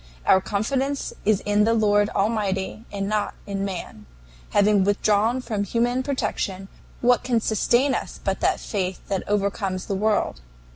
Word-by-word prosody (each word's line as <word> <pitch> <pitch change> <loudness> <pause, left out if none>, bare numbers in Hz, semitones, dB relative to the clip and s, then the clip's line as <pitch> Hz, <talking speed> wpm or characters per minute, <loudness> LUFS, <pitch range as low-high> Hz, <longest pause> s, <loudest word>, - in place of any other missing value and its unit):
Our 190 - +5
confidence 265 +8 -1
is 210 -2 +3
in 205 0 +2
the 230 +2 +3
Lord 205 -1 +3
Almighty 205 0 -1
and 200 -1 -3
not 210 0 -1
in 195 -1 -3
man. 175 - -6 0.4
Having 205 -1 +4
withdrawn 210 +4 +2
from 215 -5 -2
human 240 +5 0
protection, 200 -8 -2 0.3
what 245 0 +3
can 240 -2 +1
sustain 240 +5 +2
us - - -4
but - - -1
that - - +1
faith 185 -4 -3
which 195 -2 0
overcomes 200 -2 -1
the - - -3
world? 205 - 0
205 Hz, 150 wpm, -24 LUFS, 195-230 Hz, 0.4 s, Our